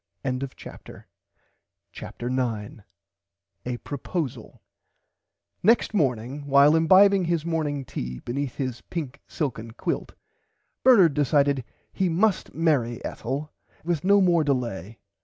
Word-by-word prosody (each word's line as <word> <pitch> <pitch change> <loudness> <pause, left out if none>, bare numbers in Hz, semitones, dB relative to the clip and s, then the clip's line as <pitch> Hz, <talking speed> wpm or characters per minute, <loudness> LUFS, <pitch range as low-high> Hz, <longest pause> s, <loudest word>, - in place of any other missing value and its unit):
[Pg 130 -1 -2 0.2
88] - - -11 0.9
CHAPTER 120 - -7
9 115 -5 -3 0.8
A 125 -1 -2
PROPOSALE 140 -2 -5 1.0
Next 225 +3 +3
morning 135 - -1
while 140 +2 +6
imbibing 190 +3 +5
his 170 -2 -1
morning 150 -4 -2
tea 60 - -5
beneath 130 - -4
his 130 -4 -4
pink 145 -5 -6
silken 115 -6 -4
quilt - - -4 0.7
Bernard 200 - +6
decided 140 -2 +2 0.3
he 190 -2 0
must 190 +4 0
marry 140 -8 0
Ethel 140 +5 -5 0.3
with 165 -2 -1
no 200 +2 +5
more 175 -3 +3
delay. 115 - -2
145 Hz, 110 wpm, -25 LUFS, 125-170 Hz, 1.0 s, while